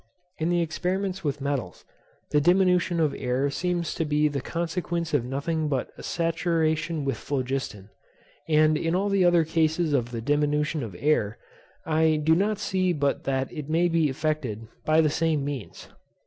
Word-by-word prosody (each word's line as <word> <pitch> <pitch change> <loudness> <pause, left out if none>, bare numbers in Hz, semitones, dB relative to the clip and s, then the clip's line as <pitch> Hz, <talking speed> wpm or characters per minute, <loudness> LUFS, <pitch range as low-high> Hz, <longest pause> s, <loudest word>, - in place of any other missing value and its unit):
In 160 +1 0
the 175 -1 +2
experiments 185 +4 -2
with 145 -2 -2
metals, 135 - -3 0.5
the 150 - +3
diminution 180 0 +3
of 155 -3 +2
air 130 +2 0
seems 175 +1 -1
to - - -1
be 150 0 +2
the 140 -2 -2
consequence 170 0 -3
of 145 -5 +2
nothing 145 +5 -2
but 135 -4 -2
a - - -11
saturation 165 -2 0
with 135 - -1
phlogiston; 130 -7 -3 0.6
and 155 0 +4
in 165 +1 0
all 200 +2 +1
the 200 -2 +3
other 175 -2 +5
cases 160 0 +1
of 120 -4 +1
the 120 -1 -4
diminution 150 +4 0
of 110 -7 -6
air, 115 -5 +1 0.5
I 160 0 +3
do 155 +1 +3
not 205 +5 +1
see 185 -2 0
but 140 -3 -1
that 135 -1 -1
it 150 -3 -6
may 165 +2 +3
be 165 -3 +2
effected 130 -6 -2 0.2
by 155 +1 +4
the 155 -2 +2
same 155 -2 0
means. 140 -6 -6
155 Hz, 170 wpm, -26 LUFS, 140-170 Hz, 0.6 s, other